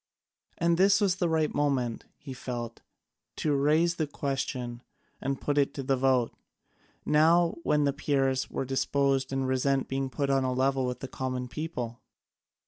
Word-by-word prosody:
And 170 0 +2
this 195 +1 +5
was 195 -3 +2
the 175 -2 +1
right 160 -1 +1
moment, 135 -6 0
he 135 -2 -8
felt, 120 -2 -6 0.5
to 150 - 0
raise 155 +5 +2
the 155 - 0
question 135 -4 -3 0.4
and 135 0 -2
put 145 0 0
it 140 0 +1
to 135 - -4
the 135 +1 +2
vote, 130 -2 +2 0.7
now 165 +3 +4
when 150 -2 +2
the 140 -1 +2
Peers 135 -2 0
were - - -3
disposed 135 0 +1
to 135 - -2
resent 135 +1 +1
being 135 0 -2
put 140 +1 -1
on 135 -1 +2
a 130 -1 0
level 130 0 +1
with 125 - -4
the 135 - -4
common 130 -1 -3
people. 125 -5 -5
135 Hz, 165 wpm, -28 LUFS, 130-150 Hz, 0.7 s, this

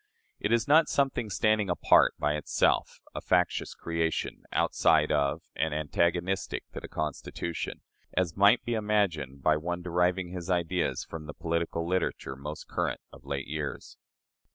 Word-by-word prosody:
It 105 - -1
is 115 -1 +2
not 155 +3 +6
something 135 -5 0
standing 110 0 +2
apart 90 - +4
by 75 0 +1
itself 75 -1 +1
a - - -5
factious 90 -1 +1
creation, 85 -1 -2
outside 75 -1 +3
of 70 -2 +1
and 80 -1 0
antagonistic 85 +5 0
to - - -6
the - - -8
Constitution 75 +2 -4 0.4
as 90 -3 +1
might 100 +5 +5
be 120 - -1
imagined 95 - 0
by 75 -1 +4
one 85 +3 -3
deriving 90 +1 +1
his 90 0 -6
ideas 90 0 0
from 80 -2 -8
the 75 - -8
political 85 0 -2
literature 90 -7 -1
most 75 +3 -7
current - - -2
of - - -14
late 70 -1 -3
years. 75 0 -5
85 Hz, 150 wpm, -29 LUFS, 75-95 Hz, 0.4 s, not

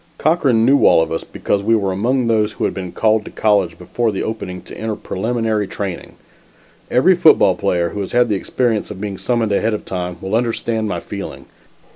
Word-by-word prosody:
Cochran 135 -9 +2
knew 140 +3 +4
all 80 - +5
of - - -6
us 80 - -2
because 100 - -2
we 115 +3 +2
were 100 -3 0
among 120 +7 0
those 110 -2 +1
who - - -5
had - - -1
been 90 -2 -6
called 110 -1 +2
to - - -7
college 100 -6 +1
before 110 +6 -1
the 95 - -3
opening 90 -5 -5
to - - -11
enter 110 -1 -3
preliminary 110 0 -2
training. 95 -3 -5 0.8
Every 135 +10 +4
football 160 - +5
player 90 -2 0
who 105 - -6
has 95 - -5
had 120 0 +3
the 105 - 0
experience 115 +2 -1
of 105 -3 -8
being 100 -2 -5
summoned 120 -3 0
ahead 110 +2 +1
of - - -7
time 90 -1 -4
will 95 +2 -5
understand 115 -1 0
my - - -3
feeling. 80 -10 -7
105 Hz, 205 wpm, -18 LUFS, 95-115 Hz, 0.8 s, all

